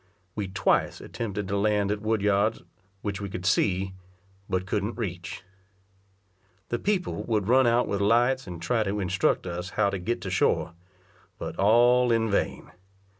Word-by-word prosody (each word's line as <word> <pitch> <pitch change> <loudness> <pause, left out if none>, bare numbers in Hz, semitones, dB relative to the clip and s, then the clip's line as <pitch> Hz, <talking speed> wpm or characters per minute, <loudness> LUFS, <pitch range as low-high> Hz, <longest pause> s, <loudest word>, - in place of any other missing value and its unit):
We 105 -2 -3
twice 95 0 +1
attempted 105 -3 -5
to 100 0 -1
land 105 -1 +1
at 105 0 -2
Wood 110 -1 0
yards, 105 +2 +2 0.4
which 100 -2 -3
we 100 - -4
could 90 -1 -6
see, 95 -1 +1 0.6
but 95 -1 -1
couldn't 105 +4 -2
reach. 90 -5 -5 1.3
The 120 - -1
people 200 -3 -1
would 105 -4 0
run 130 +1 +5
out 120 +1 +3
with 100 0 -1
lights, 120 +5 +3
and 90 -2 -7
try 100 +8 0
to 105 0 -1
instruct 95 -1 +1
us 90 0 -4
how 100 -2 +3
to 95 - -3
get 115 +7 -2
to 95 - -5
shore; 90 - +1 0.6
but - - -6
all 120 +4 +5
in 115 -1 +2
vain. 100 - -1
105 Hz, 165 wpm, -27 LUFS, 95-115 Hz, 1.3 s, run